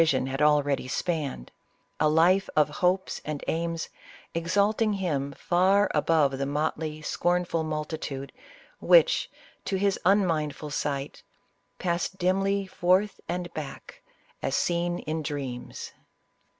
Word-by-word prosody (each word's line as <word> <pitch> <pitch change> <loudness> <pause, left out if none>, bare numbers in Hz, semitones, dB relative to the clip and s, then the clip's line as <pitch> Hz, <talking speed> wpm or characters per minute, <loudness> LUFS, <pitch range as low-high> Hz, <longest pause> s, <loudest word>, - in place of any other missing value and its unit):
i<m 140 -6 +3
had 135 +2 -3
already 145 -3 +3
spanned 145 - -3 0.3
— - - -43
a 155 - +4
life 175 +5 +4
of 150 -1 +4
hopes 185 +1 +1
and 150 -2 -4
aims 165 0 -2 0.4
exalting 205 +6 +1
him 150 -8 -1
far 190 +6 +2
above 150 -3 +2
the 140 - 0
motley, 155 +1 -2
scornful 175 0 0
multitude, 150 -3 -4 0.5
which, - - +5 0.3
to 195 - -2
his 195 0 +1
unmindful 165 -6 +1
sight, 140 -1 -3 0.3
" - - -45
Paned 175 -1 -1
dimly 195 +2 +1
forth 185 +2 +1
and 175 0 -3
back, 145 -3 -8 0.4
as - - -1
teen 175 0 0
in 160 0 -3
dreams." 140 -5 -5
165 Hz, 125 wpm, -27 LUFS, 150-185 Hz, 0.5 s, which